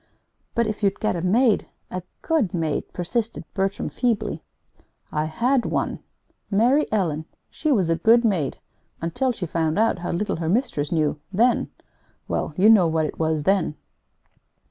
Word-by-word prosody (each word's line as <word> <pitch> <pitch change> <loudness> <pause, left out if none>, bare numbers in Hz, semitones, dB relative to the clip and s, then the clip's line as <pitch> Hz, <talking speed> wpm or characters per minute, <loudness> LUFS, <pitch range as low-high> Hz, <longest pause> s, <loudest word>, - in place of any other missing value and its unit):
"But 235 - +2
if 215 0 -3
you'd 200 -2 +1
get 215 - 0
a 170 - -2
maid 215 +5 +3 0.2
a 185 - -3 0.2
good 290 - +1
maid," 160 -3 -2
persisted 225 +6 -3
Bertram, 195 0 -1
feebly. 215 -8 -1 0.7
"I 150 0 0
had 240 - +1
one - - -1 0.5
Mary 245 +9 +3
Ellen. 165 -7 0 0.3
She 310 - -1
was 195 -10 +3
a 165 - +2
good 230 +7 +5
maid 175 -11 0 0.4
until 170 +11 0
she 195 -6 -4
found 160 0 -1
out 220 -3 +2
how 175 - -4
little 190 +2 -1
her 165 -1 -2
mistress 205 - 0
knew; 155 -3 +1
then 235 +6 +2 0.6
well, - - -2
you 195 +3 +5
know 210 -6 +7
what 160 -1 +1
it - - -6
was 160 -2 0
then. 190 -3 +1
195 Hz, 160 wpm, -23 LUFS, 165-230 Hz, 0.7 s, know